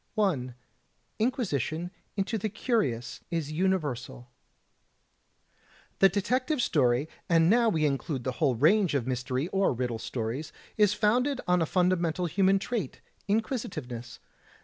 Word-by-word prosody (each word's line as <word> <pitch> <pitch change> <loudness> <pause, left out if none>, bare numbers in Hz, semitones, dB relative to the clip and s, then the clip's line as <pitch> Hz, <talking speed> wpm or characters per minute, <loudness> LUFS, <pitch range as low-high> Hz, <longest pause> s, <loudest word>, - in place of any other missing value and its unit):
J. 140 - 0 0.6
Inquisition 180 - -1 0.3
into 205 +3 -1
the 215 - -2
Curious 165 - -1
is 165 -3 -2
Universal 150 -9 -2 1.7
The 195 - +7
detective 250 - 0
story, 135 - +2 0.2
and 165 +1 +5
now 235 0 +4
we 160 -7 +1
include 140 -1 -1
the 130 - -1
whole 135 -5 +3
range 170 - +3
of 130 -5 0
mystery 130 +3 -2
or 195 -6 +2
riddle 120 -2 -2
stories, 120 +6 -4 0.2
is 210 -1 +3
founded 250 +6 +2
on 180 -1 +3
a 165 - +1
fundamental 180 -1 +1
human 190 +3 +3
trait, 220 +3 -3 0.3
inquisitiveness. 155 - -3
170 Hz, 125 wpm, -28 LUFS, 130-210 Hz, 1.7 s, The